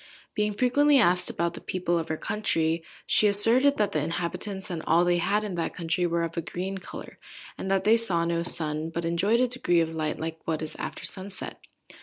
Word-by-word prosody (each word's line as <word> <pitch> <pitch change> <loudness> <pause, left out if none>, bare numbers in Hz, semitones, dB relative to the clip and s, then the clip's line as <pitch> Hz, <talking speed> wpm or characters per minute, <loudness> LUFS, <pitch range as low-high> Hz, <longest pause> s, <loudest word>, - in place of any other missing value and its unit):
Being 210 0 0
frequently 280 +5 +4
asked 180 -7 +3
about 170 0 -1
the - - -9
people 175 -2 -1
of 160 - -5
her 160 - -1
country, 165 -6 0 0.2
she 215 - +3
asserted 235 +8 +4
that 210 -2 +1
the 150 - 0
inhabitants, 185 +4 -4
and 165 -2 -3
all 170 +2 +4
they 175 0 +3
had 205 +5 +1
in 205 -3 -4
that 170 -1 -3
country, 170 +1 0
were 170 0 0
of 165 0 -4
a 170 - -1
green 185 +3 -4
colour, - - -10 0.4
and 190 - -5
that 195 -1 +2
they 220 +2 +5
saw 180 -7 +2
no 170 0 0
sun, 155 -2 0
but 165 +1 -4
enjoyed 195 +8 +2
a - - +5
degree 235 -9 +1
of 165 -1 0
light 155 -1 -2
like 160 0 -4
what 160 -1 -1
is 155 - -5
after - - -5
sunset. 195 0 -6
175 Hz, 215 wpm, -27 LUFS, 165-205 Hz, 0.4 s, they